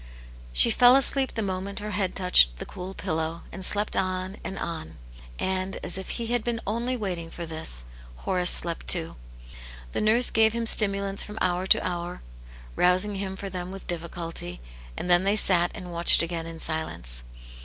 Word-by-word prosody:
She - - +5
fell 245 +1 +6
asleep 270 -1 +1
the 225 - -2
moment 190 +1 -5
her 210 0 -4
head 195 -2 -2
touched 180 - +4
the - - -7
cool 185 +1 -9
pillow, 160 +1 -4
and 190 - -4
slept 205 +3 +5
on, 185 +1 -2
and 195 - -6
on. 80 - -6 0.2
' - - -19
And, 190 0 -2
as - - -2
if 190 0 -6
he 235 - -4
had 240 +1 0 0.2
only 235 +4 -2
been - - -7
waiting 175 -5 -5
for 170 0 -8
this, 155 - +2 0.3
Hor 185 - -3
ace 180 0 +3
slept 170 -1 +2
too. 165 -2 +2 0.8
The - - -3
nurse 230 +3 +3
gave 220 0 +3
him 235 0 -3
stimulants 200 -2 +3
from 210 +1 -7
hour 180 +1 -1
to - - +3
hour, 175 - -6 0.5
rousing 185 +3 +1
him 190 -1 -4
for 195 0 -7
them 180 -1 -6
with 195 0 -9
difficulty, 165 - -6 0.4
and - - -4
then 175 0 +4
they 200 +2 +1
sat 175 -4 +2
and 180 -1 -9
watched 170 0 +5
again 165 -1 -5
in 165 0 -8
silence. 110 - -1
185 Hz, 185 wpm, -25 LUFS, 170-200 Hz, 0.8 s, fell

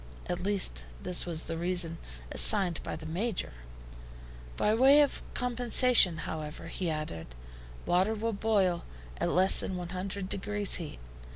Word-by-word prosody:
At 175 - -4
least, 185 - +2 0.2
this 180 0 +1
was 165 -2 -3
the 165 0 -6
reason 175 -1 0 0.3
assigned 190 -5 +4
by - - -6
the 160 - -10
Major. 180 - -4 1.0
"By 210 - +1
way 265 +5 +5
of 290 - -1
compensation, 245 -6 +4
however," 155 -1 -7
he 180 -3 -4
added, 155 - -6 0.6
"water 190 +5 0
will 225 +1 -3
boil 200 -5 0 0.3
at - - -2
less 185 +1 +3
than 185 - -4
100 185 +2 -5
degrees 205 +1 +1
heat. 165 -4 -8
185 Hz, 135 wpm, -28 LUFS, 170-210 Hz, 1.0 s, way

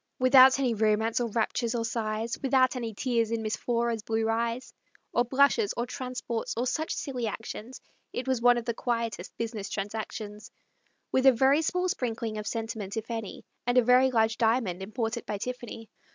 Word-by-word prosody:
Without 255 +1 +7
any 260 -4 +1
romance, 220 +1 +1
or 240 -1 -1
raptures, 230 +1 -1
or 230 -1 -1
sighs, 225 0 -2
Without 265 -1 +3
any 235 -3 -3
tears 230 0 0
in 230 -1 -2
Miss 215 0 -1
Flora's 235 -2 -1
blue 220 +1 -1
eyes, 230 +2 -1 0.4
Or 240 - +3
blushes, 280 - +2
or 235 - 0
transports, 250 -2 -4
or 240 - 0
such 315 +5 -1
silly 250 -5 -3
actions, 220 +3 -6 0.3
It 255 - -4
was 260 -3 0
one 245 0 +5
of 235 - -3
the 235 - -1
quietest 230 -1 -3
business 220 -4 -4
transactions, 210 +1 -5 0.6
With 260 +1 +3
a - - +10
very 265 +5 +4
small 360 +3 0
sprinkling 230 - -2
of 210 - -6
sentiment, 220 -2 -4
if 225 +2 -4
any, 225 -3 -5 0.2
And 245 +1 +2
a 250 - +6
very 250 +2 +5
large 225 -2 +1
diamond 225 -6 +1
imported 225 +3 -3
by 210 - -2
Tiffany. 240 0 -6
235 Hz, 180 wpm, -28 LUFS, 220-255 Hz, 0.6 s, a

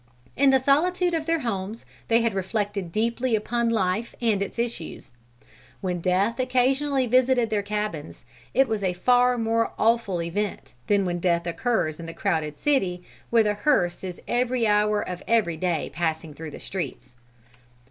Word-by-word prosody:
In 280 0 +4
the 265 0 +5
solitude 350 +7 +2
of 320 -1 -2
their 330 -1 +1
homes, 215 -2 -4 0.2
they 230 0 +4
had 230 -2 +1
reflected 200 -1 -2
deeply 235 +4 0
upon 235 +2 0
life 215 +1 0
and 220 -4 +1
its 200 - -4
issues. 235 - -4 0.7
When 180 -2 -3
death 195 +7 +1
occasionally 260 +2 +2
visited 250 -1 +3
their 210 -1 +1
cabins, 205 -11 -4 0.3
it 265 +1 +5
was 220 -2 -2
a 185 -2 0
far 245 +6 +3
more 230 0 0
awful 225 -5 +2
event 170 -5 -3
than 200 -2 +3
when 175 -1 -2
death 170 -1 +1
occurs 170 -3 -1
in 165 - -7
the 165 - -8
crowded 155 -2 -1
city, 190 - 0 0.3
where 230 -1 +4
the 210 -1 +1
hearse 205 -7 +1
is 180 -2 -6
every 245 -1 +1
hour 210 0 +2
of 180 0 -5
every 220 -8 +2
day 170 -1 -1
passing 160 0 -2
through 160 +1 -8
the - - -10
streets. 165 -9 -6
210 Hz, 165 wpm, -25 LUFS, 180-245 Hz, 0.7 s, the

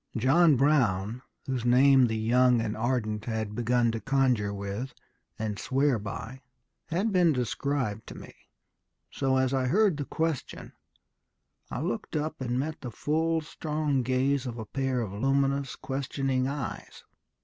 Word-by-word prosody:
John 145 +7 +5
Brown, 120 -6 +2 0.2
whose 130 -3 -2
name 130 +1 +5
the 110 -1 -2
young 120 +2 +3
and 110 -2 -2
ardent 110 -2 -1
had 110 -3 -3
begun 120 +1 +1
to 115 - -3
conjure 125 -6 +1
with 100 +6 -5 0.4
and 110 -2 -3
swear 135 -2 +1
by, 110 +5 -7 0.5
had 190 +7 0
been 175 -4 +4
described 125 -2 -2
to - - -9
me. - - -11 0.8
So, 135 -1 +1
as 130 0 +1
I 130 -1 +1
heard 200 +2 +3
the 145 - -3
question, 160 -3 -3 1.0
I 125 - -4
looked 180 +3 -3
up 155 -1 -2
and 125 -1 -1
met 155 +4 -3
the 125 - -5
full, 160 +7 0
strong 150 -3 -2
gaze 130 +2 0
of 120 -1 -5
a 110 - -5
pair 130 +2 -1
of 105 -4 -4
luminous, 135 +4 0
questioning 135 -1 -2
eyes. 140 -2 -6
130 Hz, 150 wpm, -28 LUFS, 115-140 Hz, 1.0 s, John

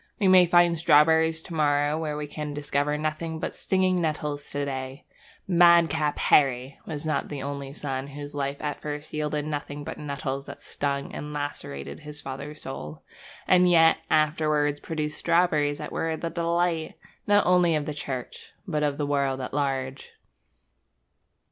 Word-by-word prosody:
We 200 - +3
may 185 -1 +7
find 175 0 +5
strawberries 160 +1 +4
to 175 - -9
morrow 145 -1 +2
where 155 -2 -3
we 150 - -3
can 150 0 -6
discover 145 0 -1
nothing 155 +1 -3
but - - -3
stinging 185 -1 +1
nettles 150 -2 -2
to 145 0 -2
day 130 0 -5 0.4
'Madcap 170 -4 +4
Harry' 135 -1 +2
was 155 -2 -5
not 155 - -1
the 140 -3 -5
only 140 -1 -5
son 135 -2 -4
whose 145 +1 -8
life 140 0 -3
at 145 -1 -3
first 150 0 -6
yielded 150 -1 -2
nothing 145 -1 -4
but - - -7
nettles 140 -2 -4
that - - -9
stung 140 -1 -3
and 150 0 -6
lacerated 145 - -5
his 150 -1 -8
father's 140 +2 -7
soul, 75 - -7 0.4
and 180 0 +5
yet 165 -2 +6
afterwards 150 -1 +2
produced 150 -2 -4
strawberries 160 -4 +2
that - - -7
were 160 -1 -2
the 165 +1 -4
delight, 170 -1 0 0.3
not 205 0 +4
only 180 -2 +4
of 150 -1 -1
the 150 - -3
Church, 130 -4 -6
but 155 -4 -1
of 145 -1 0
the 145 - -1
world 140 -2 0
at 130 - -5
large. 135 -2 -2
150 Hz, 160 wpm, -26 LUFS, 145-160 Hz, 0.4 s, may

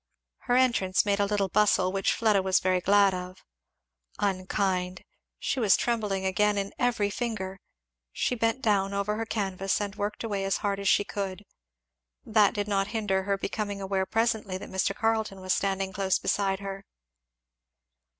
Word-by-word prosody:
Her 245 - +4
entrance 235 -8 +3
made 200 -1 +1
a 200 - +2
little 200 -1 0
bustle, 195 -2 +3
which 195 0 +1
Fleda 215 -4 +2
was 190 0 +2
very 185 -1 +1
glad 200 0 +4
of. 180 0 -7 0.7
Unkind! 185 -1 -1 0.3
She 275 - -2
was 215 -5 +4
trembling 210 -5 -1
again 205 +2 +2
in 200 0 -2
every 225 -5 +1
finger. 200 -5 -4 0.5
She - - -1
bent 230 +2 0
down 200 -3 +1
over 200 +1 -1
her 225 0 -3
canvas 195 -3 -1
and 205 -1 -3
worked 205 +2 -3
away 205 -3 -2
as 195 0 0
hard 200 -1 0
as 200 - +1
she - - +4
could. 200 -1 -5 0.8
That 215 -2 +3
did 205 -1 -1
not 195 -1 +1
hinder 205 -4 -1
her 200 0 0
becoming 205 0 -3
aware 190 -1 -1
presently 220 -4 0
that - - -10
Mr. 190 +1 0
Carleton 220 -3 0
was 185 0 0
standing 195 -1 -1
close 190 0 +1
beside 195 -1 0
her. 195 0 -6
200 Hz, 165 wpm, -27 LUFS, 190-210 Hz, 0.8 s, Her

